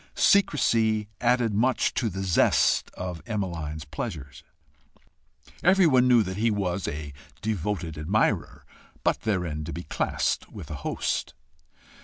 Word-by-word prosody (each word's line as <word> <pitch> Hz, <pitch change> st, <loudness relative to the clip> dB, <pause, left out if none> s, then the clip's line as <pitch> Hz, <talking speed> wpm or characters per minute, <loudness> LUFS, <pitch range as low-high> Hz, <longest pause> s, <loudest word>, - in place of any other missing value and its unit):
Secrecy 115 Hz, -, +3 dB
added 120 Hz, -2 st, +2 dB
much 125 Hz, +5 st, +2 dB
to 115 Hz, -, 0 dB
the 95 Hz, 0 st, -4 dB
zest 90 Hz, -3 st, +3 dB
of 90 Hz, -2 st, -5 dB
Emmeline's 85 Hz, -8 st, -3 dB
pleasures. 75 Hz, -, -6 dB, 1.2 s
Everyone 165 Hz, -9 st, +5 dB
knew 120 Hz, -3 st, +5 dB
that 95 Hz, -1 st, -5 dB
he 115 Hz, +2 st, +2 dB
was 100 Hz, -3 st, -1 dB
a 75 Hz, -1 st, -5 dB, 0.3 s
devoted 95 Hz, -6 st, -2 dB
admirer 95 Hz, +8 st, 0 dB, 0.4 s
but -, -, +1 dB
therein 90 Hz, -8 st, -1 dB
to 80 Hz, -, -6 dB
be 85 Hz, -, -6 dB
classed -, -, -1 dB
with -, -, -9 dB
a -, -, -3 dB
host. -, -, -2 dB
100 Hz, 125 wpm, -26 LUFS, 80-115 Hz, 1.2 s, Everyone